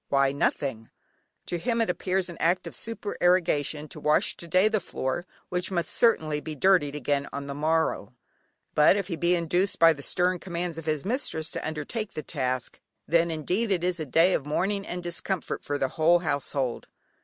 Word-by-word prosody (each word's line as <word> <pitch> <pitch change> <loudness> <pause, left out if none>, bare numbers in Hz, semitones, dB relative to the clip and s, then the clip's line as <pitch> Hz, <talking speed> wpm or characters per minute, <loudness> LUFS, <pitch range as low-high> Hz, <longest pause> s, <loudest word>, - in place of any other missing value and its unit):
Why 140 -1 +3
nothing." 135 -4 -1 0.6
To 175 - -3
him 230 +5 0
it 230 - +2
appears 185 +1 -1
an 175 -2 -8
act 180 +2 +2
of - - -7
supererogation 175 - 0
to - - -8
wash 150 0 +2
to 170 - -9
day 185 +5 +4
the 215 -1 +1
floor, 170 0 -3 0.2
which 180 0 0
must 175 -3 -1
certainly 155 -10 +2
be 155 +2 -6
dirtied 150 -3 +3
again 140 0 -1
on 140 0 -5
the 140 - -5
morrow. 160 +3 0 0.6
But 150 +5 +6
if 200 -1 -3
he 170 - -1
be 170 +2 +2
induced, 175 +3 0
by 165 0 +7
the 140 - -10
stern 180 +4 0
commands 170 -2 -4
of 160 - -10
his 155 -1 -1
mistress 195 - -1
to - - -4
undertake 160 +8 -4
the 155 - -5
task, 130 -4 -3 0.3
then 170 +1 +3
indeed 180 +8 -1
is 180 -1 0
it - - -3
a - - -2
day 165 +7 +4
of - - 0
mourning 195 +7 -1
and 180 0 -5
discomfort 175 +1 -3
for 145 - -2
the 135 - 0
whole 165 +4 +4
household. 140 -6 -2
165 Hz, 190 wpm, -27 LUFS, 150-185 Hz, 0.6 s, by